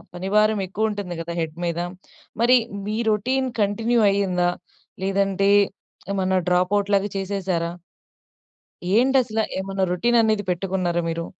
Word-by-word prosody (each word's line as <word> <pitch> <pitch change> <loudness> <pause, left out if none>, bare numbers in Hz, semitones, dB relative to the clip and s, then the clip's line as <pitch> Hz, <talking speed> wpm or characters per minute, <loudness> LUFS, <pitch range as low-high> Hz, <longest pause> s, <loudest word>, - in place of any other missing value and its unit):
పని 185 +2 -4
భారం 215 -1 +3
ఎక్కువ 220 +4 -1
ఉంటుంది 195 -5 -5
కదా! 170 +1 -5
హెడ్ 160 0 -5
మీద. 170 0 -2 0.6
మరి 250 +2 +6 0.3
మీ 215 - -2
రొటీన్ 255 +5 0
కంటిన్యూ 225 +4 +1
అయిందా? 180 -3 +1 0.5
లేదంటే 195 0 +1 0.6
ఏమన్నా 190 -1 +1
డ్రాప్ 180 +1 +2
ఔట్ 200 - -4
లాగా 200 +1 +1
చేసేశారా? 185 -3 -2 1.3
ఏంటి 265 +3 +4
అసలా? 225 -2 -1 0.2
ఏమైనా 195 0 -1
రొటీన్ 235 +6 +2
అనేది 215 -2 +1
పెట్టుకున్నారా 180 -1 -1
మీరు? 165 0 -3
195 Hz, 130 wpm, -23 LUFS, 180-215 Hz, 1.3 s, మరి